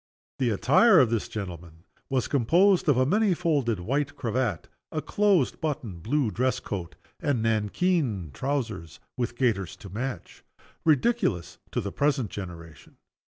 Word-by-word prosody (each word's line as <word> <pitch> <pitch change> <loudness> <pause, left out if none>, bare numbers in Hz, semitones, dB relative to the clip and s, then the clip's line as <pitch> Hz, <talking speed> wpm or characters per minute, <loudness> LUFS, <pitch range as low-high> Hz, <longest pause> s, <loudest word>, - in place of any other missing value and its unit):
The 130 -3 +2
attire 180 - +5
of 125 -4 +4
this 115 -2 0
gentleman 85 -5 -7 0.3
was 130 -2 0
composed 170 - +3
of 140 - +4
a 130 - +4
many 205 +4 +2
folded 145 - 0
white 140 +9 -1
cravat, 115 -6 -2 0.2
a 155 - -2
close 190 -1 +2
buttoned 125 - -4
blue 125 - 0
dress 130 +4 0
coat, 90 -5 -6 0.2
and 130 -6 0
nankeen 110 - 0
trousers 110 - -3 0.2
with 120 -1 -2
gaiters 105 -9 0
to 100 - -11
match, 120 +7 -6 0.4
ridiculous 155 - +1
to - - 0
the 100 - -4
present 140 -7 0
generation. 85 -5 -9
125 Hz, 140 wpm, -27 LUFS, 100-150 Hz, 0.4 s, attire